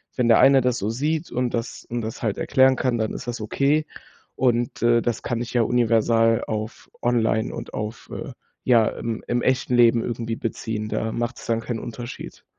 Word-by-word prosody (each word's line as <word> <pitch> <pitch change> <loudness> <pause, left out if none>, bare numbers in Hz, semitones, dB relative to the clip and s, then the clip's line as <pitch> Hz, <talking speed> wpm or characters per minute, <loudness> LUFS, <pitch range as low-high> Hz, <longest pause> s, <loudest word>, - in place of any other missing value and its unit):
wenn 125 -2 +1
der 115 - +6
eine 135 -1 +6
das 125 -1 +1
so 100 - -2
sieht 150 +7 -2
und 125 -1 -1
das 115 +1 -5
und 120 0 -2
das 110 0 -6
halt 110 -3 -1
erklären 130 -1 +4
kann, 130 -2 0
dann 110 - -1
ist - - -6
das 120 -1 -4
okay“ 140 +8 +1 0.5
und, 120 -2 0
äh, 120 0 +4
das 120 -1 -2
kann 120 -1 -2
ich 120 - -5
ja 120 -2 +3
universal 115 -1 +3
auf 110 0 -5
online 115 -2 +1
und - - -8
auf, 105 +1 -5
äh, - - -6 0.3
ja 115 -3 +4
im 115 -1 -5
im 120 0 0
echten 130 -1 +1
Leben 115 -1 +5
irgendwie 115 -1 -3
beziehen. 110 -1 -4
Da 110 0 -2
macht's 120 +2 -4
dann 115 -1 0
keinen 115 -1 -4
Unterschied. 120 +2 -8
120 Hz, 195 wpm, -23 LUFS, 115-125 Hz, 0.5 s, der